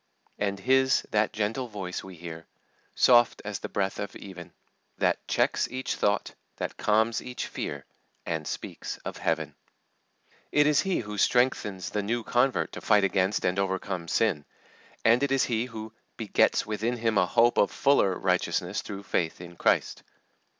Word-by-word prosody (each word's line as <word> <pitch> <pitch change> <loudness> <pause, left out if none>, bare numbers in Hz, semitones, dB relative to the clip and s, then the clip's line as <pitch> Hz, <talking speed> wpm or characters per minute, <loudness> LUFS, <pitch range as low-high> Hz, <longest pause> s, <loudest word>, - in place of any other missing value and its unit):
"And 100 -1 -1
His 130 +3 +3
that 105 0 +2
gentle 110 +4 -2
voice 95 -5 -5
we 95 -1 -10
hear, 80 -1 -9 0.5
Soft 120 -1 +5
as - - -4
the - - -6
breath 95 -1 -1
of 100 -1 -5
even; 90 -3 -10 0.5
That - - 0
checks - - +1
each 130 +1 -3
thought, 100 0 0 0.2
that - - -4
calms 110 +2 +2
each 125 0 -5
fear, 70 -1 -5 0.4
And - - -3
speaks - - -5
of - - -5
Heaven." - - -1 1.0
It 150 0 +4
is 150 0 +4
He 190 -2 0
who 105 -2 -6
strengthens 120 -7 +1
the 105 - -1
new 115 +4 -2
convert 125 +4 +1
to - - -8
fight 105 -2 +4
against 95 +1 +1
and 90 +2 +1
overcome 95 -2 -2
sin, 90 -8 +1 0.6
and 115 +3 +5
it 140 -1 +1
is 135 -1 +3
He 115 -1 0
who 110 -2 -8 0.2
"begets - - +2
within 110 +3 -2
him 115 -2 +1
a 90 - +3
hope 120 +6 +3
of - - +4
fuller 100 -10 +2
righteousness 90 +1 0
through 100 0 -7
faith 80 -4 -1
in 85 0 -10
Christ." - - +1
105 Hz, 165 wpm, -27 LUFS, 95-120 Hz, 1.0 s, Soft